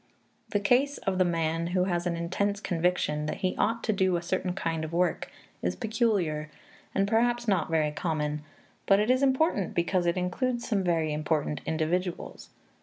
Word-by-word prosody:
The 205 - +1
case 250 +8 +2
of 190 -1 -2
the - - +6
man 165 -1 0
who 180 - +4
has 175 -1 -1
an 170 - 0
intense 200 +4 -1
conviction 165 -5 0
that - - -4
he 185 - 0
ought 230 +2 +1
to 215 - +1
do 190 -2 +2
a 170 - -1
certain 185 +1 -1
kind 165 -4 -2
of 155 - -5
work 175 0 0 0.3
is 90 +1 -1
peculiar, 190 - 0 0.5
and 195 0 +2
perhaps 240 +2 +1
not 195 -6 +1
very 155 -2 +2
common; 150 -2 -2 0.5
but 195 0 +5
it 215 +4 +3
is 255 +1 +2
important 265 - +2
because 175 +1 +1
it 170 - +1
includes 235 +7 -1
some 205 -5 +1
very 165 -3 +1
important 150 -1 -1
individuals. 170 +3 -2
180 Hz, 180 wpm, -28 LUFS, 165-205 Hz, 0.5 s, the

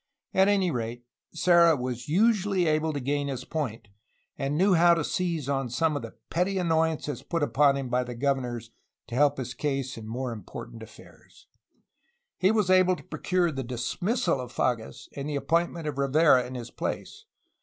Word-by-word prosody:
At 190 +1 +4
any 195 -3 +2
rate, 120 -1 -4 0.3
Serra 170 -1 +5
was 125 -1 -5
able - - -3
usually 200 -1 +3
to 155 -1 +1
gain 140 +2 -1
his 130 -2 -4
point, 125 -9 -4 0.5
and 140 +2 -2
knew 190 +3 +4
how 170 0 +6
to 165 - -1
seize 170 -4 -2
on 135 -2 -1
some 155 +6 +1
of 145 - -2
the 115 -1 -9 0.2
petty 185 +3 0
annoyances 160 -5 0
put 165 -3 -2
upon 145 -1 +3
him 135 -2 -3
by 125 +1 +1
the 125 -1 -7
governors 120 -3 -2 0.4
to - - -9
help 145 +3 +3
his 125 -1 -4
case 135 -4 -3
in 110 - -9
more 125 +2 -3
important 115 +1 -9
affairs. 110 - -16 0.9
He 190 - +4
was 210 -4 +2
able 185 0 +5
to - - -13
procure 180 -2 0
the 135 -2 -4
dismissal 135 - -1
of 125 -1 -8
Fages 115 -3 -2
and 140 +1 -4
the 150 - -2
appoint 165 +5 +1
ment 165 -2 -7
of 145 -2 -3
Rivera 140 -2 +4
in 130 - -8
his 120 -1 -7
place. 430 +1 -5
145 Hz, 185 wpm, -27 LUFS, 125-170 Hz, 0.9 s, how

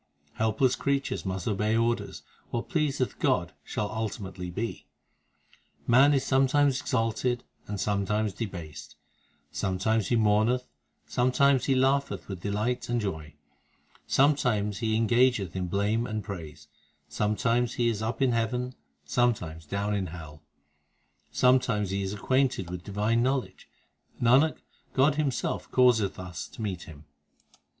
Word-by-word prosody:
Helpless 110 +4 +1
creatures 140 -7 -1
must 95 -1 -3
obey 105 +2 +1
orders; 115 +1 -1 0.3
What 120 - -4
pleaseth 150 -7 -1
God 85 -2 +1
shall 105 +6 -3
ultimately 95 -5 -4
be. 110 +6 -5 1.0
Man 135 +4 +6
is 135 -1 0
sometimes 135 +1 +3
exalted, 120 0 0 0.2
and 105 -1 -4
sometimes 105 +1 0
debased; 85 -9 -7 0.6
Sometimes 100 +3 0
he 120 - +2
mourneth, 110 +3 +2 0.4
and - - -26
sometimes 130 +2 +3
he 135 - +2
laugheth 135 +2 +1
with 95 -3 -6
delight 120 +5 -2
and 120 0 +1
joy; 80 -8 -4 0.7
Sometimes 125 -8 +2
he 110 -2 0
engageth 115 -5 +2
in 90 -1 -2
blame 105 +5 0
and 110 -1 -3
praise, 85 -7 -8 0.4
Sometimes 115 +3 0
he 120 - +1
is 110 -2 -1
up 115 +5 -1
in 130 - +3
heaven, 125 +2 -1 0.3
sometimes 90 - 0
down 100 +4 -1
in 100 -2 -1
hell; 80 -3 -10 0.9
Sometimes 115 -6 +2
he 100 0 -1
is 95 0 -2
acquainted 125 -4 0
with 90 -1 -6
divine 105 +3 0
knowledge, 130 +1 -2 0.5
Nanak, 130 +6 +3 0.3
God 140 +3 +4
Himself 140 -5 -1
causeth 120 -6 +3
us 90 -1 -6
to 115 - -9
meet 95 -4 -4
Him. 75 -2 -13
110 Hz, 130 wpm, -28 LUFS, 100-125 Hz, 1.0 s, Man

